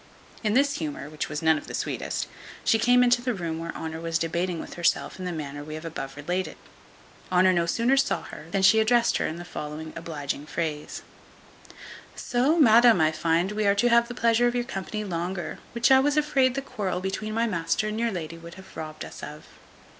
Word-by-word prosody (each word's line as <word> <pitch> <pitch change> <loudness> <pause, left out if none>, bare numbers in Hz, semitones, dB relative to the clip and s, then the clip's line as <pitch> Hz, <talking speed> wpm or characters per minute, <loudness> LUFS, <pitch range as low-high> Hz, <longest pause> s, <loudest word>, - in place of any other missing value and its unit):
In 215 0 +1
this 280 +2 +3
humour, 150 -2 -5
which 155 - -4
was 150 +1 -4
none 160 -1 +4
of - - -14
the - - -5
sweetest, - - -3 0.4
she 225 - +3
came 245 +2 +5
into 245 0 +4
the 250 -1 -1
room 165 -3 -3
where 165 0 -4
Honour 160 0 -5
was 165 -1 0
debating 170 +1 -1
with - - -7
herself 170 +2 0
in 185 - -5
the 180 - -2
manner 145 -3 -5
we 155 +1 -7
have 155 +1 -8
above 135 -4 -6
related. 180 +6 -3 0.7
Honour 185 +1 +5
no 170 -1 +1
sooner 235 +8 +2
saw 275 0 +1
her, 150 - -10
than 190 +2 0
she 200 +4 +7
addressed 235 +2 +3
her - - 0
in 155 - -4
the 175 +1 -8
following 155 -1 -6
obliging 150 -3 -5
phrase: 155 -3 -4 1.1
"Soh, 260 +7 +1
madam, 235 - +7
I 155 0 +4
find 165 +4 +1
we 210 0 0
are 200 - +4
to 240 +4 +3
have 235 0 +4
the 240 - -7
pleasure 235 +1 +3
of 240 - -1
your 245 - +1
company 215 -2 -4
longer, 175 -2 -4
which 235 +2 +2
I 265 - +8
was 290 +2 +1
afraid 270 -4 +2
the 275 - -2
quarrel 200 -9 -3
between 200 +3 -3
my 230 +1 +2
master 180 0 0
and 215 +1 -3
your 235 0 +1
lady 165 -3 -5
would 170 +1 -11
have 190 0 -14
robbed 155 -1 -6
us - - -10
of." 150 +1 -8
185 Hz, 215 wpm, -26 LUFS, 160-235 Hz, 1.1 s, I